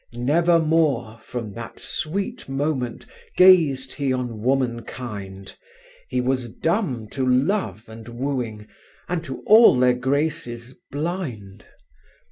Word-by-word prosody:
"Never 165 +8 +3
more—from 125 -9 -1
that 115 +1 -9
sweet 195 - -4
moment— 135 -3 -2 0.3
Gazéd 155 -8 +5
he 140 -2 -1
on 125 -3 -3
womankind; 115 -6 -3 0.5
He 125 - -1
was 125 -1 -1
dumb 145 - -1
to 135 - -3
love 125 - 0
and 110 +1 -11
wooing 120 -4 -3 0.4
And 170 -2 -2
to 135 -5 -7
all 220 - +7
their 125 0 +4
graces 130 -2 -2 0.2
blind. 135 - -5
130 Hz, 105 wpm, -23 LUFS, 120-155 Hz, 0.5 s, all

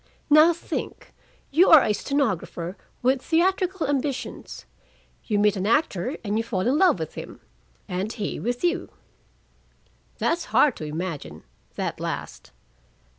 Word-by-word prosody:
Now 310 +3 +8
think 340 - -6 0.4
you 335 +7 +5
are 315 -4 +9
a 210 - +1
stenographer 195 - -2 0.3
with 260 +1 +2
theatrical 365 +2 +1
ambitions: 280 -1 -3 0.6
you 210 - 0
meet 210 0 +3
an 195 +1 -2
actor 245 - +1
and 210 0 -1
you - - 0
fall 210 -5 -2
in 250 +8 +2
love 365 - +5
with 160 -2 -5
him, - - -9 0.5
and 185 +4 -3
he 215 -4 -4
with 245 +4 -3
you." 350 +1 0 1.3
"That's 340 +1 0
hard 285 -5 +3
to 155 - -6
imagine, 150 - -5 0.3
that - - -3
last." - - -5
245 Hz, 135 wpm, -24 LUFS, 195-315 Hz, 1.3 s, are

